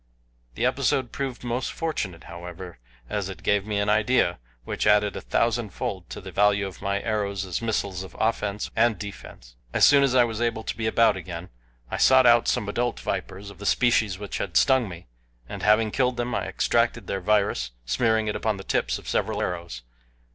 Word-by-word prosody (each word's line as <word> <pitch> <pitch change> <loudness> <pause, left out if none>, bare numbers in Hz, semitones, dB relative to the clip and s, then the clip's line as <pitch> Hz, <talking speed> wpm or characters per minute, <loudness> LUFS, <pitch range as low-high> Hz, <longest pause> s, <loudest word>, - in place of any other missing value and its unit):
The - - 0
episode 130 -3 +1
proved 135 -3 -4
most 120 +1 -2
fortunate, 100 - -3
however, 85 -2 -9 0.3
as 100 +3 -3
it 90 -2 -9
gave 100 +1 +1
me 105 -1 -1
an 100 +1 0
idea 105 - +2 0.2
which - - -2
added 105 -1 +4
a - - -5
thousand - - 0
fold - - -5
to - - -7
the - - -9
value 100 0 +3
of 95 -2 -8
my 100 0 -1
arrows 100 -3 -1
as 90 +2 -3
missiles 100 -5 -2
of 95 - -10
offense 105 -2 -1
and 115 -2 +3
defense. 90 -11 -10 0.2
As - - +6
soon 140 -1 +6
as 135 -2 +2
I 125 - +7
was 115 -1 -3
able 115 -1 -1
to - - -4
be 110 -1 -2
about 115 +1 +4
again, 90 -1 -7 0.4
I - - -2
sought 130 -1 +6
out 120 -1 +5
some 105 - 0
adult 120 +3 -1
vipers 100 +2 -4
of 100 - -16
the 100 - -8
species 110 -6 +2
which 100 0 -5
had - - -1
stung 130 -5 +4
me, 85 -1 -10 0.4
and - - -7
having 110 +1 +3
killed 125 0 +1
them, 120 0 -2
I - - -1
extracted - - +1
their 95 - -3
virus, 100 - +1 0.2
smearing 110 - +1
it 105 - -1
upon 110 -2 -1
the 95 - -8
tips - - 0
of - - -13
several - - -1
arrows. 85 -8 -4
105 Hz, 200 wpm, -25 LUFS, 95-115 Hz, 0.4 s, I